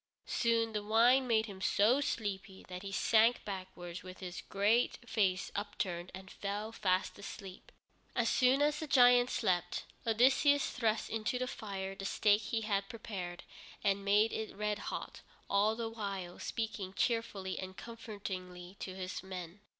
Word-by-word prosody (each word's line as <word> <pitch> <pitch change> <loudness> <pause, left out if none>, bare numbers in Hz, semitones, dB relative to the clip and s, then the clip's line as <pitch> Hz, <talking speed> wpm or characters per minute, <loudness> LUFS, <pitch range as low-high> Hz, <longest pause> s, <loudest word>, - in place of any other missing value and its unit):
Soon 230 -1 +1
the 210 - -1
wine 235 +5 +4
made 220 -2 +3
him 195 -3 -9
so 225 +9 +4
sleepy 200 -6 -3
that 180 0 -6
he 195 0 -6
sank 225 +4 +4
backwards 185 -3 -6
with 185 0 -10
his 180 -1 -6
great 210 +5 +2
face 200 -5 +1
upturned 185 -4 -3
and 190 0 -10
fell 205 +2 -4
fast 185 -3 0
asleep. 195 -2 -9 0.4
As - - +2
soon 260 +2 +4
as 300 0 +2
the 315 - -4
giant 245 -2 +6
slept, 180 -5 0 0.2
Odysseus 265 +5 +4
thrust 220 -2 0
into 225 +2 -1
the 255 - -1
fire 195 -5 -5
the 195 0 -7
stake 205 +1 +3
he 225 +2 -2
had 200 -2 -1
prepared, 190 -6 -6 0.4
and 200 -1 +2
made 210 +3 +4
it 220 -1 -4
red 210 0 -1
hot, - - -6 0.3
all 205 +2 +3
the 230 0 -3
while 200 -5 -5
speaking 205 -4 -3
cheerfully 220 -5 -1
and 185 0 -7
comfortingly 190 -5 -7
to 185 - -5
his 185 -1 -4
men. 185 -1 -7
205 Hz, 155 wpm, -34 LUFS, 190-225 Hz, 0.4 s, giant